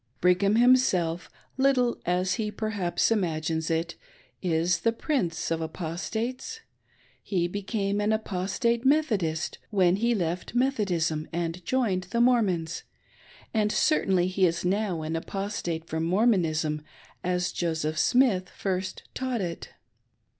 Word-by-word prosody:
Brigham 180 +3 +3
himselif, 210 -9 +3 0.3
■iittle 260 -3 +2
^s 180 +1 +1
he 215 -1 -1
perhaps 210 -3 -1
imagines 160 -5 0
it, 165 +1 -1 0.5
is 170 -1 +1
the 230 - +2
Prince 225 - -1
of 165 0 0
Apostates. 220 - -4 0.6
He 175 -4 0
becam"2 200 +1 -2
an 215 - +2
Apostate 220 +3 0
Methodist 215 - +1
when 190 -3 +3
he 235 +2 +2
left 180 +3 -3
Methodism 185 - +1
and 170 +1 -3
joiped 190 -7 0
the 235 - -1
Mormons, 195 -10 +2 0.7
and 210 -2 +2
certainly 190 - +2
he 185 0 +3
is 170 +1 -2
now 190 -3 0
an. 160 +1 -3
Apostate 175 -2 -3
from 160 0 -3
Mormonism 165 -6 +2 0.4
as 180 0 0
Joseph 160 -2 -1
Smith 230 -8 +3
first 185 -1 -3
taught 255 -2 -2
it. 175 -4 -4
185 Hz, 120 wpm, -27 LUFS, 170-220 Hz, 0.7 s, Brigham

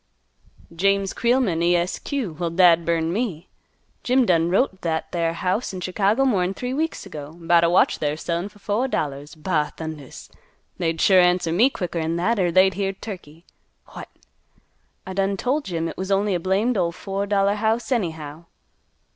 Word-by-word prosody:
"James 195 +2 +1
Creelman, 235 -9 +1
E 175 +1 +3
S 175 +1 -1
Q., 260 - -3
Wal, 170 -1 -1
dad 170 -1 +4
burn 165 0 0
me. 190 -6 -3 0.5
Jim 255 0 +2
done 170 -4 +2
wrote 200 +10 +2
t' 190 - -22
that 160 -2 -2
there 165 -1 0
house 185 +6 -2
in 185 - -5
Chicago 200 +7 +1
more'n 195 -6 +1
three 250 +4 -4
weeks 320 -2 -2
ago, 150 -5 -8
'bout 170 0 +3
a 170 - +4
watch 175 - +3
they're 145 -1 0
a - - -6
sellin' 170 +4 -3
fer 210 - -20
fo' 210 +5 -1
dollars. 145 - -3
Ba 155 -2 -1
thundas! 155 -4 -8 0.5
They'd 165 -2 -1
sure 190 +2 +5
answer 180 -2 +2
me 220 +11 +4
quicker'n 170 -8 -3
that, 205 +6 0
er 180 -2 +2
they'd 185 +2 +5
hear 195 0 -2
turkey. 175 -5 -10 0.5
What! - - -9 1.0
I 190 - -6
done 195 +1 0
tole 270 +8 0
Jim 165 - -3
it - - -7
was 190 +1 -4
only 200 +1 +1
a 175 - 0
blamed 200 +7 +1
ol' 170 -2 +1
fo' 195 +3 -4
dollar 200 0 +2
house 220 +3 -1
anyhow." 160 - -3
185 Hz, 180 wpm, -23 LUFS, 165-205 Hz, 1.0 s, sure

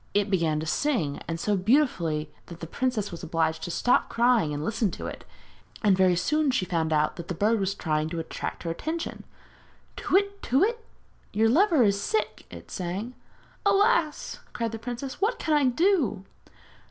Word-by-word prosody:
It 205 0 +2
began 165 -5 +1
to 155 - -4
sing, 170 - 0
and 165 0 -3
so 205 +4 +1
beautifully 180 - +1
that 170 -1 -10
the 165 - -6
princess 220 +2 -2
was 170 - -7
obliged 160 -1 -1
to - - -4
stop 245 +8 +2
crying 235 -9 +3
and 145 +1 -3
listen 220 0 0
to - - -7
it, - - -7 0.6
and 200 -3 +5
very 185 -1 +4
soon 300 - +1
she 255 -8 +1
found 165 -3 -1
out 150 0 +1
that 170 -1 -7
the 180 - -3
bird 215 +5 +2
was 195 0 -1
trying 155 -3 -1
to 170 0 -4
attract 160 - -5
her 165 - -2
attention. 320 - -4 0.7
'Tu - - -6
whit, 400 +1 +2
tu 265 +4 +2
whit! 460 +3 +1 0.5
your 220 +2 +3
lover 320 - +4
is 200 -2 +2
sick!' 215 +1 -2
it 85 0 -11
sang. 190 +7 -4 0.5
'Alas!' 405 -5 +2
cried 230 -2 -2
the 225 - -6
princess. 245 - -6
'What 465 +4 +1
can 315 - -1
I 290 -2 +3
do?' 255 - +2
210 Hz, 185 wpm, -27 LUFS, 170-275 Hz, 0.7 s, and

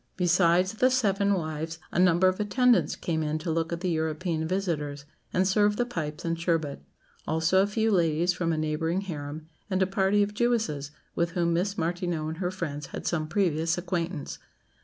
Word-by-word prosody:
Besides 180 0 +3
the 255 +4 +3
seven 200 -6 +2
wives, 160 -1 -4
a - - 0
number 180 0 +5
of 185 +2 +1
attendants 245 +4 +3
came 160 -2 -2
in 155 0 -1
to 160 +1 -3
look 165 +1 -1
at 170 0 -3
the 185 -2 0
European 160 0 -1
visitors, 155 -6 -2 0.3
and 185 +1 +2
serve 205 +1 +3
the 245 - 0
pipes 155 -11 -5
and 165 0 -1
sherbet; 165 -4 -1 0.5
also 160 +4 +3
a 200 - +2
few 220 +1 +1
ladies 170 -1 +2
from 170 -2 -1
a 160 - 0
neighbouring 155 +4 -1
harem; 155 -4 -6 0.2
and 190 -1 0
a - - +3
party 195 +1 +2
of 205 +1 -3
Jewesses, 220 -11 0 0.2
with 170 0 -1
whom 170 -2 +1
Miss 195 +4 0
Martineau 170 -1 -1
and 160 +1 -4
her 180 -2 0
friends 150 -6 -5
had - - -7
some 155 -3 -1
previous 165 -2 +1
acquaintance. 175 -3 -3
170 Hz, 185 wpm, -27 LUFS, 160-190 Hz, 0.5 s, number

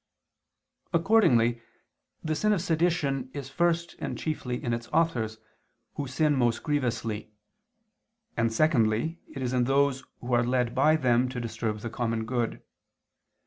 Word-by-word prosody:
Accordingly 165 - +4 0.6
the 155 - -1
sin 215 +7 +2
of 190 - 0
sedition 160 -6 0
is 140 -2 -5
first 170 +1 0
and - - -4
chiefly 140 -6 -3
in 120 - -1
its 115 0 -4
authors, 125 -9 0 0.6
who 140 - -4
sin 150 +3 +2
most 120 -3 +1
grievously; 115 -7 -2 1.0
and 115 -1 +1
secondly 125 +3 +2 0.2
it 135 - -4
is 125 0 -1
in 125 -1 +2
those 135 0 +2 0.2
who 125 0 -4
are 120 -1 +4
led 125 -1 0
by 150 +5 +4
them 125 -4 +2
to 125 -1 -5
disturb 110 -2 -3
the 115 - -5
common 115 -2 -2
good. 120 -1 -2
125 Hz, 145 wpm, -28 LUFS, 115-155 Hz, 1.0 s, Accordingly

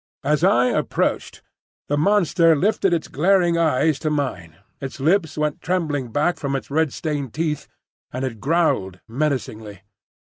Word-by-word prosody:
As 150 +1 +1
I 120 +1 +4
approached, - - -1 0.4
the 145 - 0
monster 165 -1 +3
lifted 195 +3 +1
its 165 -2 0
glaring 175 +2 +2
eyes 155 -2 +2
to 155 - -1
mine, 125 - -3 0.2
its 135 0 -7
lips 160 +1 +1
went 150 -1 -1
trembling 150 -9 -2
back 150 +7 +1
from 140 -2 -2
its 135 - -5
red 160 -1 +1
stained 145 -7 -4
teeth, 155 -2 -2 0.4
and 130 +2 -3
it 115 -4 -5
growled 135 - 0
menacingly. 115 -6 -3
150 Hz, 145 wpm, -22 LUFS, 130-165 Hz, 0.4 s, I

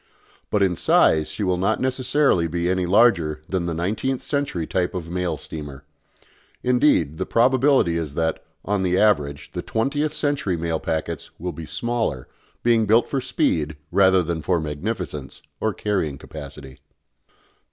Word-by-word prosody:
But 105 -2 +2
in 90 -2 +2
size 80 -1 +3
she 105 - -3
will 90 -2 +1
not 95 - +1
necessarily 130 - +2
be 85 +2 -1
any 95 -1 0
larger 85 -7 +4
than 90 -2 -1
the 85 - -1
nineteenth 110 +10 -2
century 140 - -2
type 90 +1 -1
of 85 -2 -5
mail 90 -3 -1
steamer. 75 -3 -8 0.8
Indeed 125 - +2
the - - -1
probability 130 -6 +3
is 75 -4 -4
that, 80 -1 -1 0.2
on 100 -1 0
the 90 -1 +1
average, 75 -9 +1
the - - -4
twentieth 145 +6 -1
century 145 - -1
mail 80 -1 -1
packets 80 -1 -3
will 90 +1 -4
be 80 0 -8
smaller, 115 - -2 0.4
being 115 -2 +3
built 115 +3 +4
for 135 - -1
speed 80 -9 0
rather 95 -2 +4
than 85 -1 -3
for 90 +2 +1
magnificence 75 -2 -4 0.2
or 110 - 0
carrying 95 -8 -2
capacity. 65 0 -10
90 Hz, 150 wpm, -23 LUFS, 80-115 Hz, 0.8 s, larger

